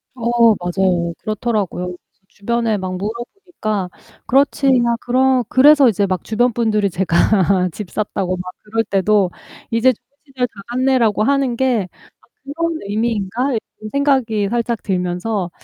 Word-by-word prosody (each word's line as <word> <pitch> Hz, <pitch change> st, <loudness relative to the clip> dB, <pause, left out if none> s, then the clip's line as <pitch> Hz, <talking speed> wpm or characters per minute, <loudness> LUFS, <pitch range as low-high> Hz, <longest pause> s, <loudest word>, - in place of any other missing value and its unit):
어 235 Hz, -1 st, +3 dB
맞아요. 175 Hz, -1 st, 0 dB
그렇더라고요. 215 Hz, -4 st, -2 dB
그래서 180 Hz, 0 st, -7 dB, 0.3 s
주변에 230 Hz, +2 st, -1 dB
막 185 Hz, -1 st, -4 dB
물어보니까 220 Hz, -, -4 dB, 0.4 s
"그렇지. 275 Hz, +1 st, +2 dB
야." 240 Hz, -3 st, +3 dB
그러 255 Hz, +1 st, +2 dB
그래서 280 Hz, 0 st, +6 dB
이제 205 Hz, -2 st, +1 dB
막 185 Hz, -2 st, -2 dB
'주변 240 Hz, +2 st, +1 dB
분들이 215 Hz, -3 st, +1 dB
제가 185 Hz, +1 st, +2 dB
"집 195 Hz, +2 st, -8 dB
샀다."고 195 Hz, -3 st, -2 dB
막 180 Hz, 0 st, -6 dB
그럴 225 Hz, +2 st, -1 dB
때도 200 Hz, -1 st, +1 dB, 0.4 s
"이제 230 Hz, +3 st, +4 dB
좋은 240 Hz, -, -12 dB, 0.2 s
시절 260 Hz, -2 st, -2 dB
다 205 Hz, -4 st, -13 dB
갔네."라고 245 Hz, -4 st, +1 dB
하는 275 Hz, -1 st, +1 dB
게 240 Hz, -6 st, 0 dB, 0.3 s
아 -, -, -27 dB, 0.3 s
그런 335 Hz, -1 st, 0 dB
의미인가?' 225 Hz, +4 st, -1 dB
이런 215 Hz, -1 st, -6 dB
생각이 260 Hz, -8 st, +1 dB
살짝 235 Hz, 0 st, -2 dB
들면서 180 Hz, +1 st, -2 dB
220 Hz, 310 characters per minute, -18 LUFS, 195-245 Hz, 0.4 s, 그래서